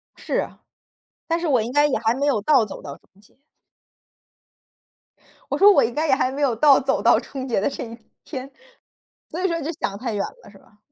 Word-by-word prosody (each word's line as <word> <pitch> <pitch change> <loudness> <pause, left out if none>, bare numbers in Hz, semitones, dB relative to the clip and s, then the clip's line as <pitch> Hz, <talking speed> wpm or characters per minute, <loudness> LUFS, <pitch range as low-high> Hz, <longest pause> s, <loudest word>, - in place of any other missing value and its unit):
是 - - -5
啊， - - -3 0.7
但 330 0 0
是 340 - -2
我 260 -6 +3
应 230 +3 -4
该 290 +2 +4
也 295 - +1
还 225 0 +1
没 280 +2 -1
有 265 -8 +1
到 265 0 +4
走 210 - -9
到 140 -1 -9
终 200 - -28
结。 210 - -26 2.1
我 - - 0
说 405 - +7
我 - - +4
应 235 - -1
该 310 +5 -1
也 265 - +4
还 260 -2 0
没 280 +2 -5
有 265 -5 +2
到 280 +3 +6
走 265 - -1
到 - - +5
终 265 -2 -7
结 245 -6 0
的 200 - 0
这 - - -6
一 230 -1 -9 0.3
天， 270 -2 -7 0.8
所 340 - -5
以 - - +3
说 335 -2 -1
就 310 +3 -3
想 200 - -3
太 235 +1 -4
远 205 - -1 0.2
了 - - -15
是 200 - -17
吧？ 210 - -25
265 Hz, 240 characters per minute, -22 LUFS, 225-295 Hz, 2.1 s, 说